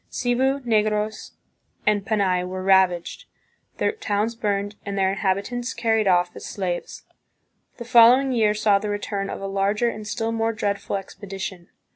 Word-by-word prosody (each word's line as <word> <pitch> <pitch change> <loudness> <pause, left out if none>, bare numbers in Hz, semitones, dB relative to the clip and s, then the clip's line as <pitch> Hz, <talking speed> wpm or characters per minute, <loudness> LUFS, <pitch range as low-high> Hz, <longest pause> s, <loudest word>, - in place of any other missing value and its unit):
Cebu, 260 +3 0
Negros, 215 -2 -1 0.5
and 210 -1 +2
Panay 195 -4 +1
were 185 +1 -5
ravaged, 190 -2 +2 0.5
their - - +1
towns 225 - -1
burned, 205 -2 -2
and 200 -1 -4
their 190 -1 +2
inhabitants 200 +6 -2
carried 225 -2 +1
off 175 -1 +2
as - - -9
slaves. 180 -3 -4 0.7
The 235 - -7
following 245 +3 +6
year 215 -4 +2
saw 205 -1 +3
the 210 +1 -4
return 200 -1 -3
of - - -6
a - - -4
larger 200 +4 +1
and 215 -2 -7
still 225 +1 -2
more 225 0 0
dreadful 200 -2 -2
expedition. 195 -2 -7
210 Hz, 150 wpm, -23 LUFS, 195-225 Hz, 0.7 s, following